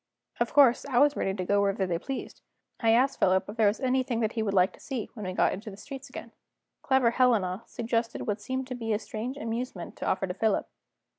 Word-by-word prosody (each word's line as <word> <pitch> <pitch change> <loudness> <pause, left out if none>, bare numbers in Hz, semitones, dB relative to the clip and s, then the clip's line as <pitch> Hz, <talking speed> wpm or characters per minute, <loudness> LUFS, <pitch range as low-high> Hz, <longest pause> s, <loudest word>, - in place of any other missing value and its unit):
Of - - 0
course 270 -4 +5
I 250 - 0
was 290 +2 +5
ready 190 - -1
to 185 -2 -3
go 200 +2 +3
where 200 0 +2
they 185 -4 -1
pleased. 270 +7 -6 0.4
I 225 - +2
asked 255 +4 +3
Philip 190 0 +3
if 205 - -7
there 220 -2 +4
was 205 - +1
anything 255 -3 +1
he 230 - -2
would 210 -2 0
like 185 0 +4
to - - -17
see, 255 -6 -5
when 210 -4 -6
we 185 - -3
got - - +2
into 210 +4 -7
the 195 - -10
streets 270 +5 -9
again. 235 -2 -9 0.5
Clever 265 -3 +3
Helena 225 -7 +2
suggested 230 0 -2
what 210 0 -2
seemed 260 +4 -3
to - - -3
be 225 -3 -2
a - - +2
strange 220 +5 -5
amusement 230 -7 -4
to - - -4
offer 190 - +1
to 180 - -4
Philip. 215 +2 0
225 Hz, 230 wpm, -28 LUFS, 200-255 Hz, 0.5 s, course